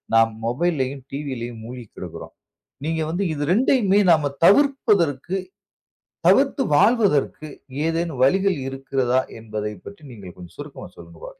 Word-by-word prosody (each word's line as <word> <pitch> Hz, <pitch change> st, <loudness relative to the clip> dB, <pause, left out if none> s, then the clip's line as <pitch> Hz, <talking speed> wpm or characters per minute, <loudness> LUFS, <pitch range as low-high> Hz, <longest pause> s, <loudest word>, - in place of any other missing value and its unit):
நாம் 115 Hz, 0 st, +5 dB
மொபைல்லயும் 135 Hz, 0 st, -1 dB
டிவிலயும் 120 Hz, -5 st, -5 dB
மூழ்கிக் 120 Hz, -2 st, -10 dB
கிடக்குறோம். -, -, -9 dB, 0.5 s
நீங்க 160 Hz, 0 st, -1 dB
வந்து 190 Hz, +4 st, -1 dB
இது 145 Hz, -1 st, -3 dB
2யுமே 215 Hz, -4 st, +3 dB
நாம் 155 Hz, -3 st, +3 dB, 0.2 s
தவிர்ப்பதற்கு, 195 Hz, -, +3 dB, 0.9 s
தவிர்த்து 275 Hz, 0 st, +3 dB
வாழ்வதற்கு 195 Hz, -, +2 dB, 0.4 s
ஏதேனும் 165 Hz, -5 st, -2 dB
வழிகள் 190 Hz, +2 st, +2 dB
இருக்கிறதா! 135 Hz, -1 st, 0 dB, 0.2 s
என்பதை 105 Hz, -1 st, -5 dB
பற்றி 200 Hz, -6 st, -11 dB
நீங்கள் 95 Hz, -6 st, -11 dB
கொஞ்சம் 90 Hz, 0 st, -13 dB
சுருக்கமாக 145 Hz, 0 st, -9 dB
சொல்லுங்க -, -, -14 dB
பார்க்கலாம். -, -, -8 dB
145 Hz, 120 wpm, -22 LUFS, 125-195 Hz, 0.9 s, நாம்